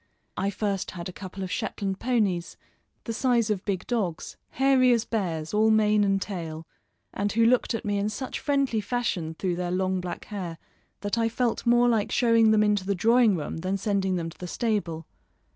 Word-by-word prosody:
I 195 - 0
first 200 -1 -2
had 170 +1 -5
a - - -9
couple 190 +1 -7
of 185 - -5
Shetland 195 -1 -3
ponies, 205 -9 0 0.5
the 230 - -4
size 235 -2 +2
of 200 -2 -2
big 190 -3 -2
dogs, 195 -9 -2
hairy 265 -1 +4
as 230 -1 +1
bears, 170 -8 -2
all 215 +1 +4
mane 215 -1 +4
and 195 -1 +2
tail, 165 -5 -5 0.5
and 205 0 -1
who 230 +2 +3
looked 245 0 +3
at 230 - -5
me 205 -1 0
in 205 +1 0
such 255 +5 -5
friendly 275 -6 +1
fashion 195 -8 -2
through 180 0 -2
their 180 0 -2
long 185 +1 0
black 180 -1 -6
hair 180 -6 -5 0.4
that 205 +3 -1
I 225 0 +2
felt 240 +1 -1
more 240 +1 +5
like 225 -4 +1
showing 230 -2 +4
them 215 -1 +4
into 210 -2 +2
the 200 +1 -1
drawing 230 +2 +4
room 155 -2 -4
than 185 +4 -2
sending 195 -2 0
them 165 -2 -3
to - - -17
the 180 - -6
stable. 180 -7 -2
205 Hz, 195 wpm, -26 LUFS, 185-230 Hz, 0.5 s, more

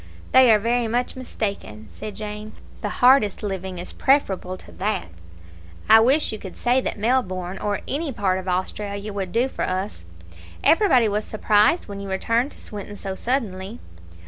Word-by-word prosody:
"They 260 -1 +7
are 215 - +7
very 235 +2 0
much 240 +2 -1
mistaken," 200 - -5
said 215 -1 -8
Jane; 210 0 -6 0.3
"the - - -2 0.2
hardest 250 -6 +5
living 190 -2 -4
is 175 - -7
preferable 190 -9 +1
to - - -15
that. 200 - -2 0.8
I 220 - +8
wish 265 +7 +3
you 215 - -6
could 190 - -9
say 245 +2 +2
that - - -3
Melbourne, 195 -6 -1
or 205 -1 -2
any 290 +2 -2
part 190 -5 0
of 190 - -9
Australia, 200 +3 -3
would 190 -3 -4
do 240 +3 +2
for - - -7
us. 185 - -2 0.6
Everybody 295 - +5
was 210 +1 -1
surprised 215 +8 +2
when 200 -1 -7
you 200 0 -6
returned 230 +7 0
to - - -17
Swinton 205 0 -7
so 195 -1 -5
suddenly." 210 -3 -3
210 Hz, 170 wpm, -23 LUFS, 190-240 Hz, 0.8 s, I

